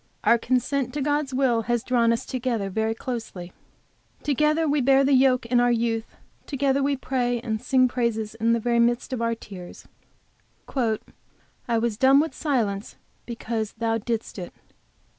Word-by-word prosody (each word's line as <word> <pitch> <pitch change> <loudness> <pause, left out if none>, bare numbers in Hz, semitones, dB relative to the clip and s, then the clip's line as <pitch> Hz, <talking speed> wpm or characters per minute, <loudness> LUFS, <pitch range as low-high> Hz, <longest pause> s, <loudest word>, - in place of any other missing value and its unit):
Our 235 - +4
consent 255 +1 -1
to 295 - -1
God's 290 -1 0
will 255 -3 +2
has 240 -1 +1
drawn 235 -2 +2
us 230 - -1
together 235 -6 -2
very 220 +2 -1
closely, 225 -8 -6 0.7
together 300 +3 +2
we 290 -1 +2
bear 270 +1 +4
the 275 +1 +3
yoke 260 -1 +4
in 240 +1 +2
our 245 0 +3
youth, 230 -1 -1 0.3
together 275 -1 +1
we 280 +1 +1
pray 245 -2 -1
and 220 -2 -3
sing 255 -1 +3
praises 235 -3 -1
in 225 +1 +1
the 235 - +1
very 235 +1 +1
midst 240 +2 +1
of 245 - -2
our 230 0 0
tears 185 -5 -11 0.9
"I 230 0 -4
was 225 -2 -1
dumb 270 +3 +6
with 315 +2 0
silence 225 - -1 0.3
because 225 -2 -4
Thou 225 0 -1
didst 225 -2 -4
it." 175 - -8
240 Hz, 160 wpm, -25 LUFS, 225-265 Hz, 0.9 s, dumb